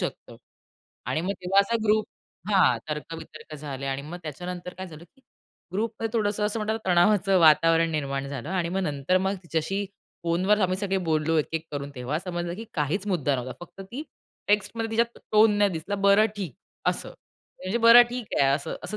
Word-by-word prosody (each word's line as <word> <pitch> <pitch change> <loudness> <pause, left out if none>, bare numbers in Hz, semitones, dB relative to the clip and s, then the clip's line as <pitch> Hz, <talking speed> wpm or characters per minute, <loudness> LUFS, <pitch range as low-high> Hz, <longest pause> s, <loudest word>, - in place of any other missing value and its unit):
शकतं. - - -5 0.7
आणि 155 - 0
मग 195 +2 -1
तेव्हा 195 +2 +4
असा 230 +4 0
ग्रुप 215 0 +3 0.4
हां, 145 - +4
तर्क-वितर्क 155 0 -7
झाले 140 -2 -6
आणि 135 +1 -2
मग 170 +4 -7
त्याच्यानंतर 180 +4 -6
काय 190 +1 -7
झालं? 160 -1 -12
की 270 +9 -28 0.5
ग्रुपमध्ये 225 +2 -2
थोडंसं 210 0 0
असं 215 +2 -2
म्हणतात 220 +1 -1
तणावाचं 190 +1 +4
वातावरण 165 +1 +5
निर्माण 140 -3 -2
झालं 140 0 -6
आणि 180 -2 -1
मग 190 +3 -1
नंतर 150 +2 +1
मग 190 +1 0
तिच्याशी 170 +5 -2 0.4
फोनवर 185 +5 +2
आम्ही 185 -1 +1
सगळे 195 -1 -1
बोललो 160 +1 +1
एक-एक 160 +2 -2
करून 140 0 -4
तेव्हा 125 +4 -2
समजलं 175 -1 -4
की 225 - -7
काहीच 160 +7 -1
मुद्दा 150 -8 +1
नव्हता. 125 +1 -5
फक्त 195 - -16
ती 285 +5 -4 0.5
टेक्स्टमध्ये 215 +2 0
तिच्या 225 +1 +3 0.3
टोन 215 0 +6
नाही 205 -1 +4
दिसला. 170 +4 -4
"बरं, 200 +2 +5
ठीक." 180 -11 -5 0.3
अस - - +1
म्हणजे 190 +6 -7
"बरं, 230 +1 +9
ठीक 245 -3 -5
आहे." 135 - +5
असं 140 - -4
असं 210 - -4
180 Hz, 175 wpm, -26 LUFS, 155-205 Hz, 0.7 s, बरं